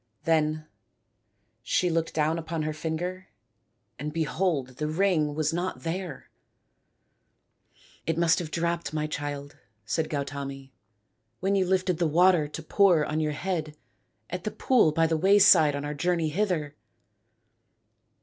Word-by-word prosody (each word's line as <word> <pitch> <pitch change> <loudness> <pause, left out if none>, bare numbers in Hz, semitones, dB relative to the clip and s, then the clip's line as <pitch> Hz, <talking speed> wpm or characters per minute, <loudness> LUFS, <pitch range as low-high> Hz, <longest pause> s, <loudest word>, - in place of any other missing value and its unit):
Then 155 -1 +1 1.0
she 180 +8 +1
looked 165 0 -1
down 160 +1 +1
upon 160 -1 -3
her 155 0 -2
finger 170 +4 -4 0.7
and 150 +2 -4
behold 155 -5 -1
the 150 - -2
ring 155 -3 +1
was 155 +1 0
not 175 +2 -3
there! 170 -3 -5 0.9
" - - -33
It 165 0 0
must 170 -1 +3
have 170 -3 -5
dropped, 170 -2 -2
my 155 0 0
child," 145 -1 -5 0.3
said 155 +9 -1
Gautami, 140 -2 -5 0.3
" 110 -1 -49
when 195 +2 0
you 190 -2 +2
lifted 185 -2 +1
the 170 - +2
water 170 0 +4
to 155 +2 -8
pour 175 -3 +4
on 150 +1 -2
your 155 -1 0
head 155 -2 -3 0.5
at - - -5
the - - -1
pool 240 -12 +3
by 165 +2 +2
the 160 0 +1
wayside 190 -5 +6
on 145 0 -4
our 145 - -3
journey 165 +1 0
hither." 160 -5 -1
160 Hz, 145 wpm, -27 LUFS, 150-175 Hz, 1.0 s, wayside